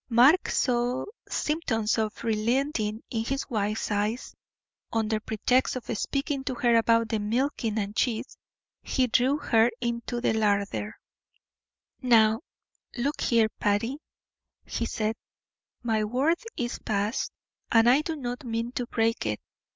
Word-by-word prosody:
Mark 260 +9 +5
saw 245 0 +1 0.2
symptoms 225 -9 0
of 215 -1 -2
relenting 225 0 0
in 225 -2 -1
his 270 +4 -2
wife's 215 -1 -1
eyes; 210 +4 -1 0.6
under 220 -1 0
pretext 245 +5 +1
of 245 -2 -4
speaking 275 +4 -2
to 260 - -2
her 240 -1 +2
about 230 0 +3
the 220 - 0
milking 225 +1 -1
and 205 0 -2
cheese, 240 +1 -1 0.5
he 260 - +1
drew 255 +4 +2
her 230 -5 +3
into 235 0 -2
the 235 - +1
larder. 205 -1 0 1.0
"Now, 225 -3 +4 0.6
look 275 +5 -1
here, 230 -2 +3
Patty," 230 +7 0 0.7
he 230 - -2
said, 220 0 -1 0.7
"my 220 -2 +1
word 270 +10 +1 0.2
is 240 -1 -2
passed, 210 +2 -1 0.4
and 225 0 +5
I 260 +5 +6
do 320 +1 -3
not 245 -1 -5
mean 230 0 -2
to 245 -1 -3
break 225 - 0
it. 105 -1 -1
230 Hz, 135 wpm, -27 LUFS, 220-255 Hz, 1.0 s, I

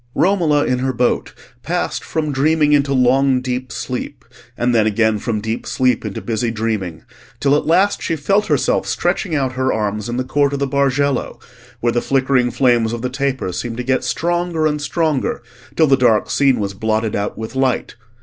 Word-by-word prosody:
Romola 170 -7 +2
in 125 0 0
her 130 +1 -1
boat 120 +1 0 0.3
passed - - -2
from 155 -2 -2
dreaming 150 +2 +2
into 140 -1 +2
long 130 0 +3
deep 125 0 -4
sleep, 130 +1 -5 0.3
and 120 +1 +1
then 110 -2 +3
again 110 0 +1
from 110 0 -2
deep 110 +2 -4
sleep 125 -3 +1
into 105 -3 -4
busy 115 0 -1
dreaming, 110 -7 -3 0.4
till 140 0 +3
at 150 - -1
last 190 +5 +3
she 165 - -1
felt 195 +8 +1
herself - - +1
stretching 175 -6 -1
out 135 -3 0
her 130 0 0
arms 105 0 -2
in 120 - -3
the 130 - 0
court 140 +2 +1
of - - -1
the 140 - 0
Bargello, 140 0 0 0.4
where 120 0 +1
the 120 - +1
flickering 130 -2 +1
flames 120 -3 +2
of 120 0 -5
the 125 - -2
tapers 130 -9 -2
seemed 120 -1 -5
to 125 - -3
get 130 +1 0
stronger 175 -1 -1
and 150 -1 0
stronger 155 -1 -1 0.3
till 160 - +4
the 135 -2 +4
dark 120 -5 +2
scene 135 -4 +3
was 100 -1 -2
blotted 110 +2 -1
out 100 0 -3
with 110 +3 -6
light. 130 -2 0
130 Hz, 190 wpm, -18 LUFS, 115-145 Hz, 0.4 s, till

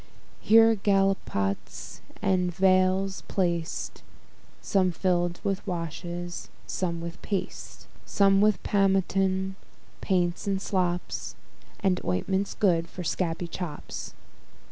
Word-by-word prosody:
Here 225 - +6
gallipots 100 - -1 0.2
and 185 -3 +2
vials 185 +1 +2
placed, 170 -3 -2 0.6
Some 185 -3 +2
fill'd 175 0 0
with 195 0 -2
washes, 175 0 -4 0.2
some 170 -3 -2
with 170 0 -7
paste; 200 -2 -4 0.2
Some 195 -1 +3
with 210 0 +3
pomatums, 195 -1 +2 0.5
paints, 180 0 0
and 195 -1 +1
slops, 180 -3 -2 0.5
And 185 -3 +1
ointments 190 - -1
good 170 -5 +2
for 180 - -7
scabby 170 0 -1
chops. 165 -3 -6
185 Hz, 100 wpm, -27 LUFS, 170-195 Hz, 0.6 s, Here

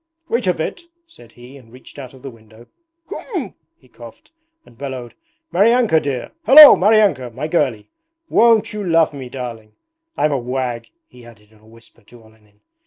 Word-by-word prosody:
'Wait 235 -3 -2
a 180 - +2
bit,' 160 - -5 0.2
said 225 - -20
he 125 +3 -15
and 115 -4 -19
reached 130 +3 -15
out 130 -3 -10
of 130 -2 -18
the 135 - -8
window. 110 0 -19 0.4
'Khm,' 360 - -7 0.2
he 130 - -26
coughed, 120 - -16 0.3
and 120 - -21
bellowed, 130 -2 -8 0.4
'Maryanka 220 -2 +3
dear. 135 -4 -5 0.2
Hallo, 300 +2 +10
Maryanka, 200 - +2
my 150 +4 -5
girlie, 130 -11 -2 0.4
won't 230 -6 +2
you 210 -1 -5
love 165 -3 +1
me, 130 -3 -9
darling? 115 -4 -9 0.4
I'm 150 - 0
a 140 - -1
wag,' 125 -1 -5 0.2
he 125 - -18
added 110 -3 -18
in 110 - -24
a 110 - -24
whisper 115 +1 -21
to 115 +2 -19
Olenin. 105 -1 -26
130 Hz, 175 wpm, -18 LUFS, 115-165 Hz, 0.4 s, Hallo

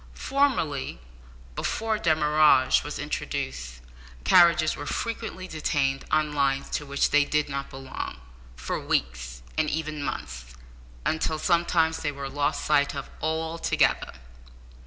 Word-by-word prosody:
Formerly, 235 - 0 0.6
before 220 -1 -1
demurrage 150 -5 +4
was - - -5
introduced, 65 -2 -4 0.4
carriages 170 - +5
were 145 - -7
frequently 225 -5 -4
detained 145 -4 -1
on 155 -1 +1
lines 140 -1 0
to 145 - -2
which 140 0 +1
they 145 0 +5
did 150 +1 0
not 140 0 -4
belong, 135 0 -6 0.4
for 65 - -3
weeks, - - -2 0.2
and 155 -1 +2
even 155 -1 -3
months, 60 - -5 0.5
until 160 0 0
sometimes 170 -1 +2
they 150 - -1
were 140 -1 -6
lost 145 +1 -1
sight 145 -1 +2
of 140 - -6
altogether! 160 +1 0
150 Hz, 120 wpm, -26 LUFS, 135-160 Hz, 0.6 s, carriages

